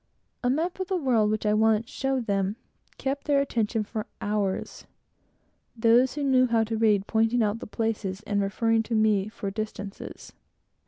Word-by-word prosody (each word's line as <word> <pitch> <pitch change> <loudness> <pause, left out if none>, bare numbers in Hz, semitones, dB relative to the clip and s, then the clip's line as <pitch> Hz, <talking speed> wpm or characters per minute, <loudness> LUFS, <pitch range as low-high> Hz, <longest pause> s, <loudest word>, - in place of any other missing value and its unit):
A 245 - +2
map 330 +8 -1
of 375 - -2
the 380 -1 0
world, 240 -9 +2
which 215 0 -1
I 210 - +3
once 220 +1 +3
showed 270 -2 -2
them, 195 0 0 0.4
kept 275 +2 -3
their 285 -1 +4
attention 225 -5 0
for 215 0 -5
hours; 205 -2 -2 0.9
those 235 +3 +4
who 295 - -2
knew 260 -2 +4
how 230 -1 +2
to 225 +1 -3
read 210 -3 +3
pointing 225 +2 +2
out 210 +1 0
the - - -8
places 210 -3 -2
and 205 -1 0
referring 225 +3 +1
to 225 +1 -3
me 215 -2 +2
for 200 -2 -5
the 200 +3 -3
distances. 205 -2 -8
225 Hz, 175 wpm, -26 LUFS, 210-250 Hz, 0.9 s, their